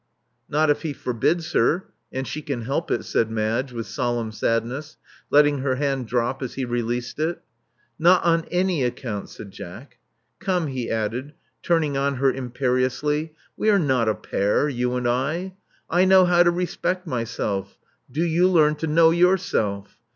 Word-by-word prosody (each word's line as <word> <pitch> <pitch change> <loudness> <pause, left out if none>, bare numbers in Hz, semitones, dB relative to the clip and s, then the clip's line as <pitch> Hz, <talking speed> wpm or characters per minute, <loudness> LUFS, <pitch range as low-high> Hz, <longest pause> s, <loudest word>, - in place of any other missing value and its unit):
Not 155 +1 +3
if 145 - -1
he 155 -3 -3
forbids 155 +8 -1
her 175 +5 +2
— - - -50
and 130 0 -4
she 155 - -4
can 140 -5 -4
help 140 +7 -2
it," - - -1
said 115 - +1
Madge 110 +4 -1
with 115 -2 -5
solemn 120 -2 -2
sadness, 120 +7 -2 0.3
letting 145 -1 +4
her 130 -1 0
hand 135 -3 -1
drop 125 +3 -1
as 130 - -5
he 135 - -2
released 120 +2 -3
it. 160 +3 -1 0.6
Not 175 +2 +5
on 165 -1 +2
any 180 -4 +1
account," 120 -4 -3
said 100 - -10
Jack. 115 +7 -11 0.4
ComcJ," 180 -6 -1
he 125 -3 -3
added, 115 +6 -2 0.3
turning 155 -5 +1
on 140 0 0
her 135 +1 +2
imperiously: 130 +4 -1 0.2
we 215 - +1
are 205 - +5
not 130 - +2
a 110 - +1
pair, 100 +9 0
you 125 -2 -1
and 125 -1 -1
I. 155 +10 -1 0.3
I 175 +3 +3
know 190 -1 +6
how 175 -1 +4
to 175 - +6
respect 180 +1 -2
myself: 115 - -3 0.3
do 155 +6 0
you 170 +2 +3
learn 155 -4 +4
to 160 - -3
know 160 +1 +5
yourself. 170 - +1
140 Hz, 170 wpm, -23 LUFS, 120-165 Hz, 0.6 s, know